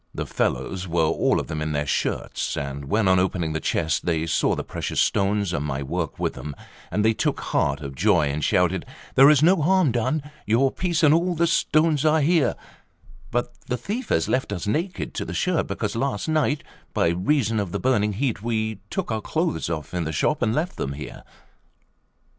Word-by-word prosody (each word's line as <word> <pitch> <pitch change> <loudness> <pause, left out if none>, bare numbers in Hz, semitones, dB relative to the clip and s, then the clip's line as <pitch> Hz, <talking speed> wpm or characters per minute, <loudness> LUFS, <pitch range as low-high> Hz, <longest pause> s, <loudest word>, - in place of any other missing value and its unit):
The - - -3
fellow - - -1
were 85 -1 +2
all 80 - +2
of - - -3
them 80 0 -4
in 75 0 -2
their 75 0 0
shirts; 70 - -2
and 70 0 -4
when, 105 +7 +1
on 95 0 +5
opening 90 -4 0
the 80 - -1
chest, 80 +1 -1
they 80 -2 +1
saw 85 - +1
the - - -3
precious - - -3
stones 100 -2 +1
and 75 - -1
my 70 -1 -3
work 80 +2 -3
with - - -1
them, 75 -2 -7 0.4
they 105 +4 +2
took - - -1
heart 70 +1 0
of 70 -2 -6
joy 65 - +3
and 75 +2 -3
shouted: 90 +3 +2 0.3
"There 135 +2 +8
is 150 -1 +5
no 185 +4 +6
harm 180 -2 +3
done; 130 +6 0 0.2
your 125 +5 +3
piece 170 -2 -1
and 150 -1 +7
all 175 +2 +2
the 170 +1 +2
stones 155 -2 +2
are 155 0 +4
here; 160 0 +3 0.7
but 120 +1 -1
the 125 - -1
thief 215 - -4
has - - +2
left 130 -4 0
us 90 -4 -3
naked 165 - -2
to - - -3
the - - -6
shirt, 180 -3 0
because 100 +2 -3
last 130 -1 -1
night, 155 -2 +1 0.3
by - - +3
reason 110 - +1
of 100 -4 -2
the - - -2
burning 105 -5 +1
heat, 115 -1 -1
we 110 -2 -2
took - - -3
our 110 -1 -1
clothes 160 - -1
off 80 -2 -4
in 90 -1 -1
the 80 - -2
shop 150 - 0
and 115 -2 +1
left 170 +4 -2
them 70 - -3
here." 75 -1 -8
110 Hz, 205 wpm, -24 LUFS, -, 0.7 s, There